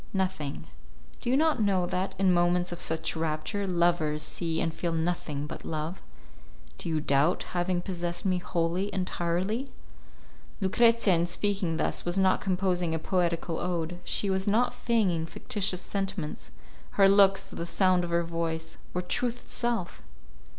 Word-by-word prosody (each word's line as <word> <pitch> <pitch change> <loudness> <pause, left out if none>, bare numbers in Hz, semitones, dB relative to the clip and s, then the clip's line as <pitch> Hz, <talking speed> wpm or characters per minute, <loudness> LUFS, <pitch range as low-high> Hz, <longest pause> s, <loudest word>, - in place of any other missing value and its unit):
"Nothing. 185 -7 -2 0.6
Do - - -3
you 260 - +4
not 310 -5 +2
know 195 -4 +2
that, 185 +2 -2
in 190 -1 +4
moments 175 0 +2
of 175 - -5
such 160 +1 -1
rapture, 160 +6 -2
lovers 170 -4 +1
see 165 0 -2
and 165 - 0
feel 165 +1 -2
nothing 160 -3 -1
but - - -7
love? 160 +3 -4 0.8
Do - - -4
you 160 -1 +1
doubt 150 +3 +2
having 175 0 0
possessed 175 -2 -3
me 185 -2 +2
wholly, 175 +3 -1
entirely?" 185 +7 -1 0.9
Lucrezia, 230 +1 +4
in 170 0 +2
speaking 185 -2 0
thus, - - 0
was 175 +2 -1
not 190 -1 +3
composing 180 -3 0
a - - +1
poetical 170 -1 -1
ode; 175 -1 -2
she 205 - 0
was 190 +1 0
not 225 +5 +3
feigning 190 -9 +1
fictitious 190 +1 -2
sentiments; 195 -5 -4 0.5
her 195 - +7
looks, 195 0 +5
the 170 - -5
sound 185 -1 +3
of 175 - -3
her 170 0 +2
voice, 165 -1 -3 0.2
were 180 - 0
truth 245 +6 -1
itself! 235 -7 -2
180 Hz, 150 wpm, -28 LUFS, 165-195 Hz, 0.9 s, her